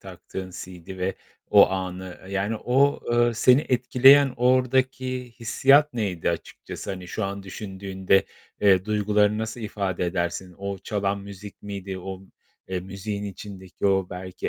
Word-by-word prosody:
taktığın 95 0 -8
CD 90 0 -9
ve 95 +1 -1 0.4
o - - +7
anı. 95 -1 -5
Yani 100 +3 -1
o, 135 +5 +2
eee, 120 0 +3
seni 125 +4 +5
etkileyen 130 +2 +5
oradaki 130 0 +1
hissiyat 140 +5 +4
neydi 95 -8 -1
açıkçası? - - -6
Hani 90 -2 -7
şu 110 - -3
an 100 0 -4
düşündüğünde, 95 0 -1 0.4
eee, 95 -2 +4
duygularını 105 0 +2
nasıl 110 +2 -4
ifade 100 -4 -2
edersin? 85 0 -3
O 100 -1 -4
çalan 100 -1 -2
müzik 100 +1 -11
miydi? 100 -2 -6
O, 95 +1 -7 0.5
eee, 90 -1 -2
müziğin 100 +2 -5
içindeki 100 -1 -6
o 95 -2 +2
belki 90 0 -5
100 Hz, 135 wpm, -25 LUFS, 95-115 Hz, 0.5 s, o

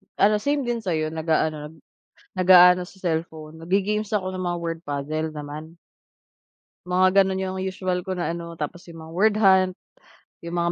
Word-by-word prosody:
ano 210 +1 +4
same 285 +3 0
din 240 -1 -2
sayo, 160 -7 -1
naga-ano, 155 -1 -1 0.6
nag-aano 180 0 +7
sa 190 - -17
cellphone 160 -2 -4
nag 165 - -11
ge-games 210 +2 0
ako 185 -2 -2
ng 185 -1 -4
mga 175 -1 -2
word 165 -1 -3
puzzle 155 +2 -3
naman. 150 +2 -8 1.1
Mga 185 +1 +3 0.2
gano'n 190 0 -2
yung 190 0 -3
usual 185 -1 -2
ko 190 - -5
na 180 -2 -2
ano, 170 -1 -8
tapos 175 +4 -5
'yong 165 - -11
mga 160 - -11
word 210 +2 +3
hunt, 190 -3 +4 0.7
'yong 170 +1 -7
mga 170 0 +1
180 Hz, 170 wpm, -24 LUFS, 160-190 Hz, 1.1 s, nag-aano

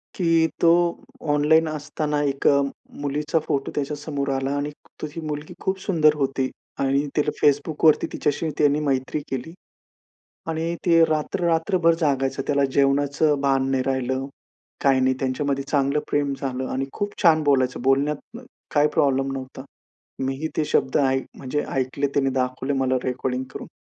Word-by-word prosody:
की 165 -3 +3
तो 165 - +6 0.6
ऑनलाईन 160 +2 +4
असताना, 150 0 -2
एका 140 0 +3 0.4
मुलीचा 150 +3 0
फोटो 140 -1 -1
त्याच्या 145 0 -2
समोर 145 -1 -3
आला 135 +1 -1
आणि 145 +1 -2 0.3
तो - - -2
ही 165 - -6
मुलगी 150 0 -5
खूप 190 0 -1
सुंदर 155 -6 +3
होती 135 -2 -1 0.3
आणि 140 +1 +1
तिला 150 0 +2
Facbookवरती 150 +2 +3
तिच्याशी 150 +2 -1
त्याने 145 0 +3
मैत्री 140 0 -1
केली 135 +5 -4 1.0
आणि 165 +1 -2
ते 165 -2 +6
रात्र, 155 +3 -1
रात्रभर 165 +1 +3
जागायचं, 135 -2 +1
त्याला 140 -1 +3
जेवणाचं 140 +2 +2
भान 135 -1 +2
नाही 130 -1 +1
राहिलं. 130 0 -1 0.6
काही 135 -1 +4
नाही 130 0 +3
त्यांच्या 130 +1 -1
मध्ये 140 -1 0
चांगलं 140 0 +1
प्रेम 145 -1 +1
झालं 130 -1 -3
आणि 135 +1 -1
खूप 205 0 -3
छान 160 -3 +5
बोलायचं, 130 -4 +2
बोलण्यात 140 - 0 0.4
काही 145 0 +4
प्रॉब्लेम 135 -1 +2
नव्हता. 130 0 -7 0.6
मी 135 0 -1
ही 160 - -1
ते 155 - +2
शब्द 135 -2 +1
ऐक 135 -2 +1
म्हणजे 145 +2 -2
ऐकले, 135 +2 0
त्यांनी 135 -1 +1
दाखवले 130 +1 -1
मला 130 -1 +1
रेकॉर्डिंग 130 0 -2
करून. - - -7
140 Hz, 155 wpm, -23 LUFS, 135-150 Hz, 1.0 s, तो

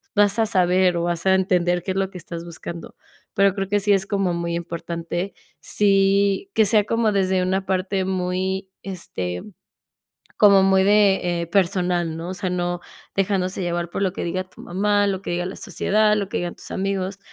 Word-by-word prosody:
vas 205 +1 +3
a 225 - +4
saber 180 -3 +2
o 170 - -1
vas 170 0 -2
a 190 0 +5
entender 180 -2 +1
qué - - -2
es 190 - -3
lo 195 -1 0
que 185 - -10
estás 170 -1 -7
buscando, 170 -1 -8 0.4
pero 200 -1 +3
creo 195 -1 -3
que 205 - +2
sí 205 0 +3
es 195 -1 +2
como 195 -3 0
muy 170 0 -2
importante, 170 +2 -4 0.3
si 200 - +2
que 220 - +4
sea 210 +1 +4
como 225 0 +1
desde 190 -1 +1
una 190 +1 0
parte 190 +1 -1
muy, 190 +1 -2
este, 90 - -5 1.0
como 200 -2 +6
muy 190 0 +4
de, 195 -4 +3
eh, 170 - -4
personal, 175 -3 +1
¿no? 165 +2 -5
O 185 - -4
sea, 185 -1 -3
no 175 -1 -2 0.4
dejándose 195 -1 0
llevar 175 -1 -2
por 195 - -3
lo 190 -2 +1
que - - -4
diga 185 +2 -2
tu 185 - -18
mamá, 205 +3 +1
lo 190 -1 -2
que - - -5
diga 175 +1 -1
la 185 - -5
sociedad, 210 +3 +1
lo 200 -2 -2
que - - -2
digan 175 -1 -3
tus - - -9
amigos, 195 0 -2
190 Hz, 195 wpm, -22 LUFS, 175-195 Hz, 1.0 s, como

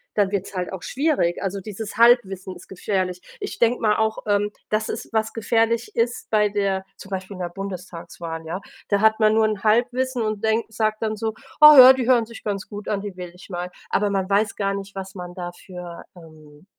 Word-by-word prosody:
dann 200 -2 +2
wird's 200 0 -3
halt 180 +1 -3
auch 185 -1 -7
schwierig. 275 - 0
Also, 195 0 -3
dieses 215 +1 -7
Halbwissen 200 -6 +3
ist - - -15
gefährlich. 185 -1 -2 0.2
Ich 405 - -5
denke 235 +1 +2
mal 210 -2 +2
auch, 220 0 0
ähm, 205 0 +1 0.2
dass 215 0 0
es, - - -5
was 220 0 0
gefährlich 225 +1 0
ist 235 +1 -1
bei 210 -1 +3
der 195 -2 -1
zum 195 - -12
Beispiel 190 +1 -5
in - - -10
der 175 - -1
Bundestagswahl, 170 -3 -7
ja? 175 +4 -4 0.3
Da 200 -1 +2
hat 220 +1 +3
man 215 0 +5
nur 220 0 +4
'n 215 -2 -2
Halbwissen 245 +3 +1
und 215 -1 -2
denkt 220 0 0
sagt 215 0 -1
dann 215 0 -1
so: 220 +1 -3 0.3
„Oh 300 -1 +11
ja, 260 +1 +11
die 260 -2 -2
hören 240 -3 +4
sich 230 0 -12
ganz 200 -2 -3
gut 205 -1 -7
an, 205 -2 0
die 205 -3 -7
wähle 180 -1 -7
ich 185 +2 -15
mal.“ 180 0 -5 0.2
Aber, 205 0 +1
man 195 -1 -1
weiß 205 +1 +1
gar 195 -1 0
nicht, 195 0 -6
was 195 0 -7
man 180 -1 -7
dafür, 175 -1 -8
ähm, 155 -1 -16
205 Hz, 215 wpm, -23 LUFS, 185-220 Hz, 0.3 s, Oh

